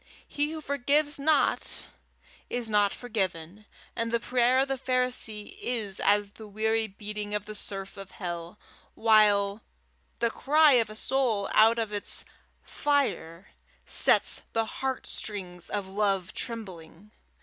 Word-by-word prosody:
He 295 +1 -1
who 315 0 -6
forgives 285 +1 +2
not 310 +2 +1 0.6
is 240 -2 -2
not 205 -1 +3
forgiven, 200 -4 -4 0.3
and 230 0 -2
the 235 - +1
prayer 250 +1 +2
of 270 - 0
the 270 - -1
Pharisee 250 - -1
is 220 - -2
as 205 0 +2
the 220 +1 -12
weary 220 +2 0
beating 210 +1 -6
of 210 0 -3
the 215 - -7
surf 195 -2 -4
of 195 -1 -8
hell, 175 0 -6 0.4
while 210 -2 +4 0.6
the 235 -1 0
cry 300 +5 +4
of 235 -5 +3
a 215 - -9
soul 230 -4 0
out 225 +2 +6
of 220 -2 -2
its 205 - -2 0.4
fire 275 - -1 0.3
sets - - +3
the 225 0 +1
heart 265 +3 -4
strings 180 -4 -5
of 200 -2 -3
love 195 -1 -1
trembling. 195 -4 -7
215 Hz, 140 wpm, -28 LUFS, 200-245 Hz, 0.6 s, out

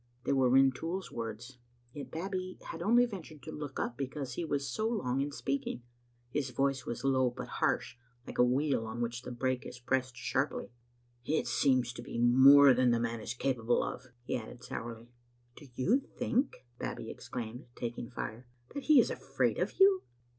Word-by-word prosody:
They - - +1
were 130 -2 +4
Rintoul's 135 +8 +2
words. 115 +2 -6 0.3
Yet 145 - -7
Babbie 185 +2 -4
had 165 - -7
only 240 +6 +5
ventured 165 - -9
to - - -7
look 145 -3 -6
up 120 - -2
because 135 -1 -4
he 170 - -3
was 145 -4 -1
so 215 - -1
long 135 - 0
in 145 +1 -2
speak 140 -1 -2
ing. 120 - -4 0.5
His 140 -1 -1
voice 135 +1 0
was 120 - -4
low 130 -2 +3
but 120 - -7
harsh, - - 0 0.3
like - - -8
a - - +8
wheel 130 -1 +1
on 110 +2 -5
which 120 +1 -2
the 125 - -7
brake 130 +1 -1
is - - -8
pressed 125 +1 -1
sharply. 135 +1 -1 0.3
" 120 0 -38
It - - 0
seems 130 -3 +2
to - - -7
be - - -6
more 135 +3 +8
than 125 0 +3
the 120 -1 +3
man 115 -1 -2
is 120 - -4
capable 120 -2 +1
of," 130 - -5 0.2
he 125 - -2
added 120 +1 -9
sourly. 115 -1 -7 0.2
" 120 0 -38
Do 145 - -13
you 200 - +3
think," 255 - -2
Babbie - - -4
exclaimed, 120 +2 -7
taking 120 -1 -4
fire, 115 0 -6 0.3
"that 285 - -6
be 305 -3 +8
is - - +3
afraid - - 0
of - - -2
you?" 385 -1 +6
130 Hz, 190 wpm, -32 LUFS, 120-145 Hz, 0.5 s, a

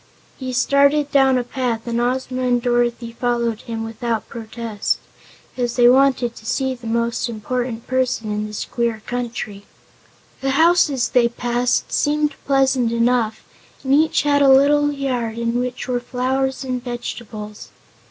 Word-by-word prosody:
He 260 -1 -5
started 280 +3 +3
down 270 -2 +4
a 250 - 0
path 245 -2 -3
and 235 0 -1
Ozma 255 +1 -1
and 250 -1 +2
Dorothy 240 -1 0
followed 235 -1 -1
him 225 -1 -5
without 225 -1 -3
protest, 225 -2 -3 0.6
as 245 -2 -2
they 240 -1 +6
wanted 255 -2 +3
to - - -13
see 265 +1 0
the 240 -2 -10
most 235 +2 -1
important 235 +1 -3
person 255 -4 -1
in 210 0 -2
this 210 -1 -5
queer 235 -2 -2
country. 230 -4 -4 0.8
The 270 0 0
houses 320 -6 +3
they 240 -2 +3
passed 240 +1 -1
seemed 300 0 +1
pleasant 265 -3 +2
enough 235 -1 +1 0.4
and 265 0 +1
each 315 +2 +3
had 285 -1 +3
a 275 - +6
little 290 +2 +5
yard 250 -5 -2
in 235 +1 -1
which 250 +1 -4
were 250 -1 0
flowers 260 +2 -1
and 255 -2 -3
vegetables. 220 -3 -7
245 Hz, 150 wpm, -20 LUFS, 235-265 Hz, 0.8 s, they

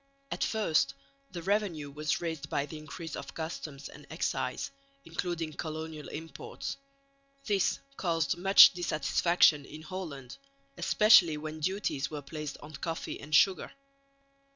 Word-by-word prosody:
At - - -1
first 160 -10 +1 0.3
the 175 -2 -7
revenue 185 -7 -1
was 150 +2 -1
raised 160 -4 -4
by 140 - 0
the 155 +1 -8
increase 160 +1 -7
of 140 - -8
customs 155 -3 -6
and - - -13
excise, - - -2 0.3
including 170 -3 -3
colonial 155 0 -5
imports. 155 -2 -6 0.7
This 200 -5 +2 0.2
caused 165 -5 0
much 195 +3 +8
dissatisfaction 170 -2 +3
in 155 +3 -11
Holland, 155 -7 -7 0.4
especially 190 - +6
when 155 +1 -6
duties 155 -5 -1
were 150 -2 -6
placed 150 0 -6
on 150 +1 -10
coffee 165 +3 -4
and 150 +1 -1
sugar. 190 +3 +4
160 Hz, 130 wpm, -30 LUFS, 150-175 Hz, 0.7 s, much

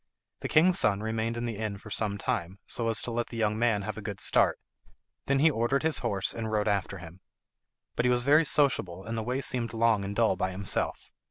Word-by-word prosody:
The - - -4
king's 175 +3 +4
son 100 -1 +2
remained 110 +1 -2
in 120 - -3
the 115 -3 -4
inn 105 -2 -3
for 110 +2 -13
some 105 -1 -1
time, 100 -5 -3
so 115 -1 +1
as 115 - +1
to 120 - -4
let 120 0 -2
the 115 - -8
young 105 -1 0
man 115 -4 +1
have 110 +1 -5
a - - -8
good 100 -1 -6
start; - - +2 0.7
them 140 - +2
he 155 +4 +4
ordered 125 +3 0
his 160 -1 +1
horse 95 -2 -2
and 110 -1 -4
rode 105 0 0
after 100 -1 -1
him. 90 0 -12 0.8
But - - 0
he - - +4
was 120 0 +2
very 150 +4 +5
sociable 130 - +1
and 115 - -4
the 110 - -2
way 125 +4 -2
seemed 120 -4 -1
long 115 -3 +2
and 100 +1 -5
dull 115 -4 +2
by 95 +1 -1
himself. 95 +1 -3
110 Hz, 235 wpm, -28 LUFS, 100-120 Hz, 0.8 s, very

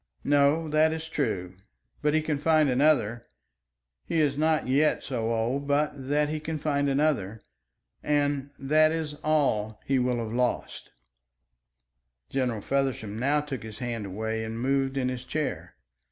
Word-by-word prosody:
"No, 145 +3 +3
that 155 +1 +4
is 160 0 -5
true; 105 - -2 0.5
but 150 +1 +2
he 155 - +2
can 150 -2 -1
find 155 -2 +3
another. 125 -4 +2 0.9
He 165 - 0
is 145 -3 +2
not 155 0 +1
yet 145 +4 +2
so 115 -4 -2
old 120 +5 -1
but 145 +1 +2
that 145 +2 0
he 155 +1 -3
can 155 +1 -4
find 145 -1 0
another. 135 -8 0 0.6
And 145 -1 0
that 155 +3 +3
is 160 -2 -3
all 145 -9 +2
that 110 -1 -14
he 135 -1 +2
will 125 -1 +1
have 115 -1 -4
lost." 125 0 -2 1.4
General 125 -5 -1
Feversham 130 -6 -1
now 145 +4 +2
took 145 -4 -5
his 110 -1 -9
hand 115 -4 -4
away 110 +3 -3
and 110 +1 -5
moved 135 +1 0
in 130 -2 +1
his 125 -1 -3
chair. 150 +3 -4
140 Hz, 155 wpm, -27 LUFS, 120-150 Hz, 1.4 s, that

